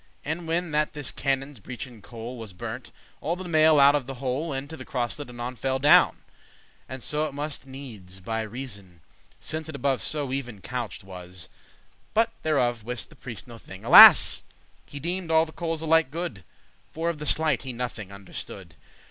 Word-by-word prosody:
And 160 +3 -3
whenne 170 0 -1
that 150 +1 +1
this 145 -3 -3
canon's 135 -1 -2
beechen 125 +1 -8
coal 115 +3 -8
Was 110 -4 -8
burnt, 90 - -7 0.3
all 165 +4 -1
the 185 - -7
limaile 155 -3 +5
out 140 +1 +8
of 145 -4 -1
the 135 - -5
hole 135 +5 -2
Into 140 +3 -5
the - - -9
crosselet 125 +2 -3
anon 120 +1 -6
fell 130 +3 -1
down; 145 +3 +5 0.7
And 130 -1 -5
so 150 +1 +1
it 140 - -9
muste 145 -1 -3
needes, 110 -9 -10
by 110 +4 -3
reasoun, 100 -8 -8 0.4
Since 160 0 -4
it 155 - -6
above 135 -1 0
so 145 -4 -2
*even 120 -6 -4
couched* 120 0 -5
was; 90 -2 -8
*exactly - - -31
laid* - - -32
But 225 +1 +3
thereof 120 -7 +1
wist 125 +2 -4
the - - -14
priest 120 -2 -7
no 115 -2 -11
thing, 95 -2 -12
alas! - - +10 0.5
He 145 - -8
deemed 175 +3 -2
all 160 0 +4
the 160 - -11
coals 165 -1 -3
alike 160 -2 +3
good, 155 - -5 0.5
For 165 +1 -3
of 170 -3 -1
the 150 - -5
sleight 155 -5 +2
he 130 - -5
nothing 115 -5 -5
understood. 95 -2 -9
135 Hz, 190 wpm, -26 LUFS, 115-155 Hz, 0.7 s, alas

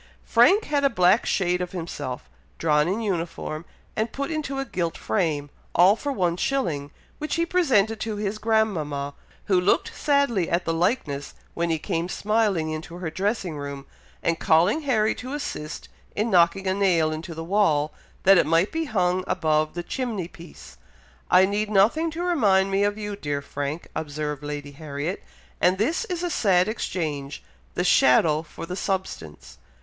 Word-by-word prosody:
Frank 415 +3 +5
had 290 -1 0
a 275 - +5
black 185 -1 +3
shade 180 -2 +1
of 180 0 -4
himself, 130 - -5 0.3
drawn 150 -1 +2
in 200 +6 -1
uniform 170 -5 -3 0.3
and 220 +1 -1
put 280 +3 -3
into 295 -4 -3
a 270 - -2
gilt 170 -8 -2
frame, 150 -8 -1 0.2
all 185 +4 +6
for 285 +5 -3
one 180 -8 0
shilling, 170 - -1 0.3
which 305 0 -2
he 335 0 +1
presented 240 - +2
to 220 -1 -3
his 205 +1 -3
grandmama, 165 -11 0 0.3
who 185 -3 +3
looked 180 - +1
sadly 280 - +1
at 175 +1 0
the 165 - 0
likeness 165 - -1 0.2
when 170 0 -1
he 165 - +1
came 165 +3 -2
smiling 205 -7 0
into 160 +2 -6
her 175 -3 -4
dressing 190 -3 -2
room, 140 -1 -6 0.4
and 165 -1 0
calling 175 - +3
Harry 220 -7 +2
to 255 +2 -7
assist 160 - -5 0.3
in 220 +2 0
knocking 180 +2 +4
a 190 - +1
nail 180 -5 +2
into 160 +2 -6
the 165 - -5
wall, 165 -5 +2 0.3
that 195 -1 +7
it - - +2
might 165 +4 +3
be 325 0 -1
hung 185 -7 +1
above 155 -3 +1
the 175 - -3
chimney 220 -6 -3
piece. 170 - -13 0.5
"I 185 +1 +6
need 205 +2 -1
nothing 220 +12 +3
to 330 +2 -4
remind 200 - +3
me 195 +1 +2
of 205 +1 0
you, 210 -1 -4
dear 145 -7 -3
Frank," 145 +3 -4
observed 150 -1 -3
Lady 145 -1 -5
Harriet, 145 +4 -5 0.4
"and 180 +2 +4
this 310 - 0
is 360 -5 -4
a 350 - -1
sad 190 -8 +3
exchange, 150 -10 -3 0.3
the - - 0
shadow 150 +4 +4
for 160 - -9
the 180 +2 -5
substance." 185 - -4
185 Hz, 170 wpm, -25 LUFS, 155-215 Hz, 0.5 s, that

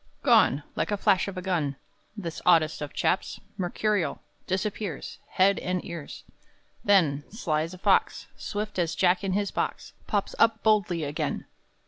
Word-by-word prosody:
II. - - -36 0.2
Gone! 140 +2 +4
like - - -1
the 205 - 0
flash 195 -2 +3
of 195 -1 -6
a 180 - -4
gun! 165 -7 0 0.4
This 170 -5 -5
oddest 160 -4 +4
of 145 -1 -4
chaps, 185 - 0 0.2
Mercurial, 200 0 -1 0.3
Disappears 190 -3 -3
Head 195 +1 +4
and 180 -1 -2
ears! 170 -4 -7 0.6
Then, 160 -8 +3
sly 165 -8 -1
as 165 +3 -4
a - - -12
fox, - - +2
Swift 210 -1 -4
as 170 -2 0
Jack 180 +1 +3
in 195 -1 -1
his 200 0 0
box, - - -3
Pops 205 -2 -1
up 225 -1 +3
boldly 200 -7 +2
again! 145 0 -3
185 Hz, 160 wpm, -27 LUFS, 165-205 Hz, 0.6 s, Gone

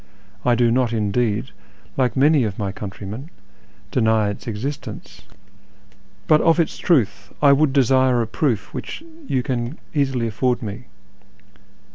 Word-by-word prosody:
I 120 - +3
do 120 0 +3
not, 125 -1 +1
indeed, 110 +2 0 0.4
like 125 -2 0
many 145 0 +4
of 105 -3 -3
my 100 -2 -2
countrymen, 105 - -7 0.6
deny 110 -4 +2
its 100 - -9
exist 125 +6 -4
ence, - - -10 1.0
but 155 -1 +5
of 165 +1 +4
its 165 - 0
truth 100 - +1
I 140 -1 +6
would 145 0 +3
desire 130 -2 +3
a 115 - +1
proof 115 -1 -1
which - - -6 0.3
570U 130 -2 +1
can 125 +1 -2 0.2
easily 135 -5 0
afford 120 +3 0
me. 110 +4 -6
125 Hz, 140 wpm, -21 LUFS, 110-135 Hz, 1.0 s, I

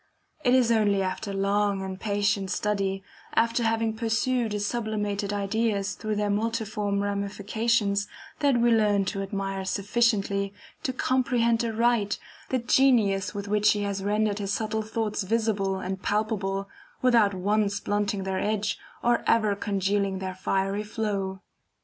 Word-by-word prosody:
It 250 -2 +4
is 245 -3 +4
only 205 -3 +3
after 190 +2 -3
long 200 0 +1
and 190 0 -5
patient 205 -2 0
study, 195 -2 -1 0.3
after 230 +1 +2
having 225 -1 +1
pursued 230 +1 0
his 205 0 -1
sublimated 210 -3 -2
ideas 205 0 0
through 215 -1 -3
their 205 0 0
multiform 210 -2 -1
ramifications, 205 +1 0 0.3
that 280 -4 +3
we 235 0 +4
learn 210 -3 +3
to 195 +1 -2
admire 195 -1 -3
sufficiently, 200 -1 0 0.3
to 260 - -1
comprehend 245 -3 +1
aright, 230 -2 +1 0.3
the 260 - +1
genius 230 -6 +3
with 200 0 -4
which 210 +1 +4
he 205 -1 -2
has 200 -1 -2
rendered 210 0 +1
his 200 -1 -2
subtle 220 +1 -1
thoughts 215 -1 -2
visible 205 -2 0
and 190 0 -4
palpable, 200 -2 -1 0.4
without 230 -6 +4
once 200 +1 +1
blunting 205 -1 -1
their 190 0 -2
edge, 210 0 -1 0.2
or 240 0 +2
ever 215 -3 +3
congealing 200 -1 0
their 190 0 -4
fiery 195 +2 -1
flow. 205 -3 -3
205 Hz, 140 wpm, -27 LUFS, 200-225 Hz, 0.4 s, It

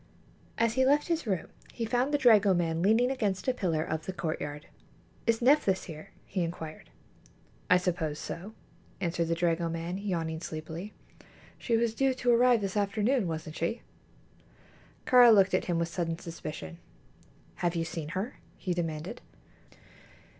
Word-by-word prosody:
As 230 -1 +2
he 260 +1 +3
left 290 +5 +3
his 335 -7 -1
room 190 -4 -1 0.3
he 230 - -3
found 245 +4 +1
the 290 - +3
dragoman 190 - +4
leaning 225 +7 +3
against 210 -7 -1
a 255 - +3
pillar 165 -9 0
of 160 -1 -4
the - - -1
courtyard. 150 -4 -4 0.6
"Is 230 +1 +2
Nephthys 250 -8 +4
here?" 155 -2 -9 0.2
he 185 - -2
inquired. 165 -2 -5 0.8
"I 180 - +7
suppose 170 -4 -1
so," 195 +9 -7 0.4
answered 170 -1 -1
the 165 - +1
dragoman, 170 +1 -1
yawning 165 -5 -2
sleepily. 160 +5 -6 0.6
"She 230 -2 +1
was 230 -1 +1
due 265 +2 +1
to 245 -1 +1
arrive 240 -1 +5
this 195 0 -3
afternoon, 210 +3 +1
wasn't 160 -1 -5
she?" 170 +8 -2 1.2
Kāra 245 -2 +8
looked 195 -3 +5
at 185 - +2
him 175 -2 0
with 170 0 0
sudden 165 -2 -2
suspicion. 155 - -7 0.8
"Have 175 0 0
you 165 -1 0
seen 165 -2 -5
her?" 205 +7 -4 0.2
he 185 - -2
demanded. 170 +5 -4
185 Hz, 150 wpm, -29 LUFS, 165-230 Hz, 1.2 s, Kāra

